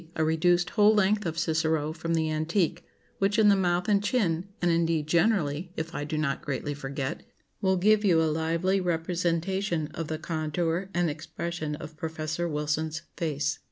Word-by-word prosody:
a 160 - +1
reduced 175 +2 +2
whole 210 0 +5
length 210 -1 +2
of 165 0 -4
Cicero 160 -2 0
from 165 +1 -2
the 160 -1 0
antique, 160 +3 0 0.4
which 195 +2 +2
in 215 -2 +6
the 200 - +6
mouth 180 0 +1
and 205 -1 +3
chin, 190 -6 0
and 175 -1 +2
indeed 165 -2 +1
generally, 170 -1 +1
if 160 +1 -4
I 145 - -3
do 155 +1 -3
not 150 -3 -1
greatly 145 +1 -3
forget, 140 +1 -4 0.4
will 190 -1 +2
give 210 +3 +4
you 175 -5 +4
a - - +3
lively 165 +5 +1
representation 170 0 -1
of 165 -2 -4
the 155 - -3
contour 165 +3 -2
and 175 0 +2
expression 155 +1 -4
of 155 +1 -10
Professor 160 +1 -3
Wilson's 155 +1 -2
face. 145 -3 -1
165 Hz, 170 wpm, -28 LUFS, 155-180 Hz, 0.4 s, in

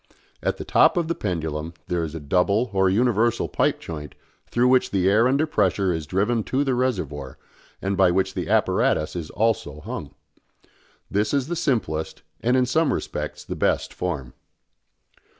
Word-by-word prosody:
At - - -1
the - - -6
top - - +4
of 170 -2 +1
the 170 - 0
pendulum 80 - -3
there 85 -1 -1
is 80 0 -5
a - - -4
double 100 - +1
or 95 -1 +3
universal 120 +2 +2
pipe - - +1
joint 75 -4 -7 0.3
through 120 +1 +2
which 130 0 +4
the 95 -2 +1
air 110 +5 +5
under 140 +4 +2
pressure 95 - +1
is 80 -3 -4
driven 105 +6 +1
to 135 +2 +1
the 135 -2 0
reservoir, 90 - -2 0.5
and 100 +1 0
by 95 -1 +5
which 95 +2 +1
the - - -4
apparatus 75 - +2
is 85 -3 -4
also 105 -9 -1
hung. - - -7 1.0
This 105 +5 +1
is 140 +1 0
the 175 - -1
simplest, 115 - -1 0.2
and 125 +2 +2
in 130 - +3
some 155 +5 +2
respects - - -4
the - - -5
best, - - 0
form. 75 -8 -4
100 Hz, 170 wpm, -24 LUFS, 85-125 Hz, 1.0 s, air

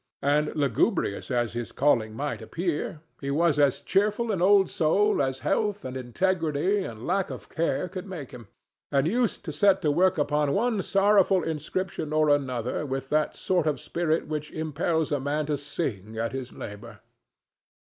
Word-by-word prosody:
And, 150 +2 +2
lugubrious 145 - 0
as 120 -3 0
his 120 -1 -4
calling 110 -7 +2
might 145 +5 -3
appear, 165 -1 -3 0.2
he 140 - -4
was 150 +1 +2
as 140 -2 +3
cheerful 210 +3 +1
an 190 -4 -1
old 195 +1 +5
soul 200 +3 +2
as 130 -1 -1
health 210 -1 0
and 130 0 -5
integrity 165 - 0
and 115 -7 -7
lack 195 -1 0
of - - -8
care 170 +2 -1
could 185 +1 -7
make 165 -9 -7
him, 120 -4 -11 0.4
and 140 -1 +2
used 225 +3 0
to 160 - -3
set 195 +6 +4
to 150 - +3
work 185 +4 +3
upon 150 -1 +1
one 220 -1 +1
sorrowful 195 -2 +3
inscription 160 0 -3
or 155 -1 +3
another 130 -3 0
with 135 -1 -4
that 155 0 +1
sort 180 -4 0
of 150 - 0
spirit 165 -1 -1
which 150 -1 -4
impels 160 0 -1
a 145 - +1
man 145 +3 -1
to 150 0 0
sing 110 - -4
at 115 +1 -1
his 130 -2 -5
labor. 105 +3 -9
155 Hz, 170 wpm, -26 LUFS, 135-185 Hz, 0.4 s, old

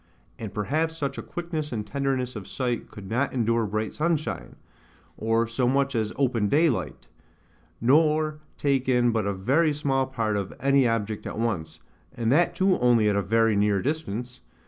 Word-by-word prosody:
And 110 -3 -5
perhaps 155 +10 -1
such 140 -3 -3
a - - -3
quickness 165 -3 -5
and 110 -3 -3
tenderness 130 0 -2
of 105 -3 -7
sight 125 -3 -3
could 100 -2 -10
not 125 +6 0
endure 115 -2 +1
bright 110 +1 -2
sunshine, 160 -1 -2 0.6
or 115 +1 +1
so 115 +2 0
much 135 +1 +1
as 110 -3 -1
open 120 -7 +1
daylight; 150 -2 +1 0.7
nor 155 +4 +3 0.2
take 135 -2 0
in 120 -1 +3
but 110 -3 0
a 100 - 0
very 140 - +2
small 135 -2 0
part 115 -5 -1
of 100 -2 -4
any 135 -1 +3
object 110 -2 -2
at - - -6
once, 85 -9 -2 0.4
and 115 -2 0
that 170 +5 +3
too 190 0 +2
only 120 -3 +4
at 100 - +1
a 100 - +2
very 115 +2 +2
near 100 -1 +2
distance. 125 -3 -3
125 Hz, 170 wpm, -26 LUFS, 110-140 Hz, 0.7 s, only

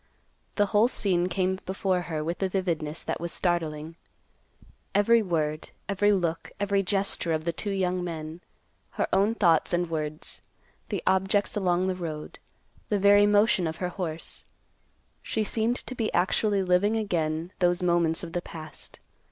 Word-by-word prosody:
The 205 - +3
whole 210 +3 +6
scene 180 -7 +1
came 185 +1 0
before 190 -1 0
her 160 -3 -3
with 170 +4 -3
a 190 - +1
vividness 170 -5 -2
that - - -3
was 170 0 -3
startling; 165 -2 -2 1.0
every 230 +3 +5
word, 155 -5 -1 0.2
every 205 +1 +3
look, 170 -4 0
every 200 -1 +2
gesture 195 -3 0
of 155 0 -2
the 170 - 0
two 205 - -4
young 185 -2 0
men, 160 -1 -6 0.5
her - - 0
own 200 +4 +3
thoughts 170 -7 +3
and 175 -1 0
words, 155 -1 -4 0.5
the - - -2
objects 190 +2 +2
along 185 -3 +1
the 190 - +1
road, 160 -4 -6 0.5
the 210 - +2
very 205 +1 +6
motion 205 -4 +3
of 160 - -3
her 180 +1 -3
horse; 170 -3 -5 0.8
she 220 - -1
seemed 225 +3 0
to - - -5
be 230 -3 -1
actually 195 +3 +2
living 185 +4 +3
again 165 -5 -1
those 175 0 +2
moments 170 -2 +2
of 165 -1 -7
the 175 - -1
past. 160 -3 -9
180 Hz, 160 wpm, -27 LUFS, 165-200 Hz, 1.0 s, whole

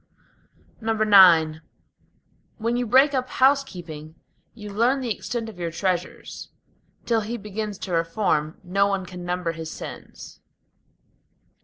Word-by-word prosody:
IX 190 -8 +5 1.0
When 230 +2 -1
you 245 0 -1
break 265 +5 +5
up 255 -1 -1
housekeeping, 175 - 0 0.4
you 210 -3 -9
learn 240 +7 +2
the 245 -4 -1
extent 235 -2 -4
of 210 -5 -10
your 170 -1 -2
treasures; 180 +1 -3 0.6
Till 230 -2 +2
he 225 +3 -4
begins 210 -1 -5
to 190 - -7
reform, 165 -2 0
no 195 +2 +2
one 195 -2 -1
can 180 0 -9
number 175 -1 -2
his 160 -1 -7
sins. - - -10
200 Hz, 125 wpm, -24 LUFS, 175-230 Hz, 1.0 s, IX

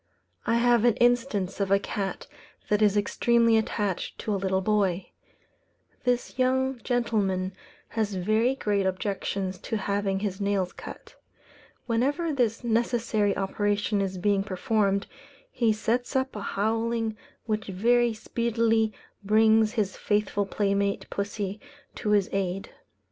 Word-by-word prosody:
I 230 - +3
have 240 -1 +4
an 240 -3 +4
instance 240 -6 +1
of 200 -1 0
a 195 - +5
cat 195 -1 -4 0.4
that 210 0 +2
is 210 -1 +4
extremely 230 +2 +3
attached 210 -4 -1
to 215 - -2
a - - +1
little 190 -1 0
boy. 195 -2 0 0.9
This 245 +1 -1
young 260 0 +1
gentleman 200 -6 0 0.4
has 215 -3 -1
very 215 +7 +2
great 205 -6 0
objections 190 0 -2
to 225 - -3
having 200 -1 -1
his 200 -1 -3
nails 200 -2 0
cut. - - -10 0.7
Whenever 285 +8 0
this 240 -3 0
necessary 230 -3 +1
operation 205 +1 0
is 190 -1 -2
being 200 +2 +2
performed, 200 +1 0 0.5
he 235 -3 +2
sets 235 +5 -1
up 265 -1 0
a 210 - -4
howling 225 +2 -1 0.3
which 215 -1 -2
very 235 +5 +3
speedily 225 0 +1 0.3
brings 220 +1 +4
his 205 -4 -1
faithful 205 -1 0
playmate 200 0 0
pussy 200 0 -3 0.3
to 210 - -4
his 205 -2 +3
aid. 195 -1 -2
210 Hz, 130 wpm, -27 LUFS, 195-230 Hz, 0.9 s, a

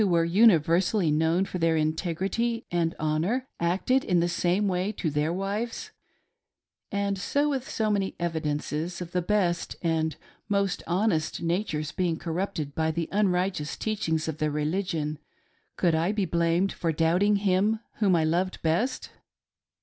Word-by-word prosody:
were 170 -4 +3
universally 180 -1 +4
known 160 +5 +2
for 180 - -5
their 165 -1 +2
integrity 190 +9 -1
and 170 -1 0
honor 165 +12 0
acted 190 +10 +1
in 180 -4 +2
the 170 - +2
same 180 +4 +1
way 185 +2 0
to 175 -6 -3
their 150 +2 0
wives; 210 - -3 1.0
and 200 -1 -1 0.3
with 270 -3 -2
so 215 -1 0
many 195 -2 -1
evidences 160 0 -2
of 175 -1 -6
the 180 - 0
best 175 -2 0
and 160 -1 0 0.3
most 200 -2 0
honest 175 -2 0
natures 165 -4 -1
being 175 -3 -1
corrupted 165 -3 -3
by 160 +1 0
the 165 +1 -2
unrighteous 185 -5 0
teachings 165 -8 -1
of 160 0 -4
their 155 0 +1
religion, 150 0 -2 0.6
could 170 -2 +2
I 165 +4 +1
be 210 -2 0
blamed 170 +3 +1
for 165 - -1
doubting 170 +6 +3
him 200 +2 +2 0.2
whom 195 -4 +3
I 165 - +2
loved 175 +4 0
best 175 +11 0
175 Hz, 145 wpm, -27 LUFS, 160-200 Hz, 1.0 s, universally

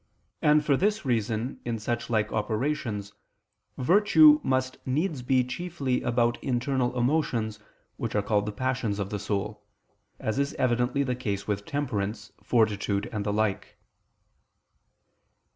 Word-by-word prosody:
And 150 0 +4
for 145 - +4
this 210 +4 0
reason 115 0 -1
in 120 -1 -2
such 120 +2 -3
like 110 -2 +1
operations 110 -2 -2 0.6
virtue 210 - +6
must 130 0 -1
needs 150 +2 -1
be 130 +1 +2
chiefly 135 -1 -2
about 120 0 +1
internal 125 0 0
emotions 120 -5 0 0.4
which - - -3
are 105 - +2
called 105 0 +1
the - - -1
passions 120 -2 -1
of 100 -1 -3
the 105 - -2
soul, 105 +1 -3 0.6
as 110 +5 -2
is 140 +1 -1
evidently 125 +1 +1
the 130 -2 -1
case 105 -5 -3
with 100 -1 -2
temperance, 110 -6 -3
fortitude 105 -3 +1
and 105 -2 -2
the 105 - -1
like. 105 -1 -1
120 Hz, 135 wpm, -27 LUFS, 105-135 Hz, 0.6 s, virtue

